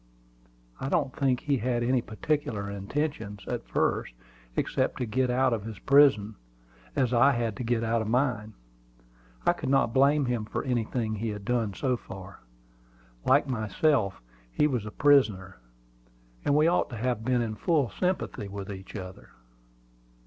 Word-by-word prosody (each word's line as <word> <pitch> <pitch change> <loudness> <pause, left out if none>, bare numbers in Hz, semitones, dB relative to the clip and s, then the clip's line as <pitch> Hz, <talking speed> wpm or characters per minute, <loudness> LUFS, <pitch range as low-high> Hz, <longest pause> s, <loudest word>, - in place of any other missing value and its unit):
I 135 - -3
don't 145 -5 0
think 130 -2 +1
he 140 -2 +1
had 120 0 0
any 125 +1 +2
particular 110 -3 -2
intentions, 105 -1 -3
at - - -4
first, - - 0 0.4
except - - 0
to 125 - -1
get 125 +3 0
out 130 0 +2
of 110 -3 -2
his 110 -2 -7
prison, 120 -7 +4 0.6
as 130 -3 +1
I 135 +4 +5
had 115 -4 -1
to - - -4
get 115 -1 0
out 115 0 +1
of 110 - -3
mine. 115 -3 0 0.9
I - - +5
could - - -5
not 135 -4 +3
blame 140 +2 +4
him 120 -3 -1
for - - -3
anything 120 -3 -1
he 110 +1 -3
had 105 -1 -6
done 115 -4 0
so 130 -3 0
far. 95 -3 -10 0.9
Like 140 +3 +4
myself, 110 - 0 0.3
he 150 - +2
was 125 -8 -1
a - - -6
prisoner, 105 -10 +3 0.8
and 145 - +2
we 150 +1 +4
ought 175 - +2
to 120 - -7
have 120 0 -1
been 125 0 +1
in 110 -2 -3
full 140 - +1
sympathy 180 - -2
with 100 0 -6
each 95 +1 -9
other. 95 -2 -8
120 Hz, 165 wpm, -28 LUFS, 105-135 Hz, 0.9 s, I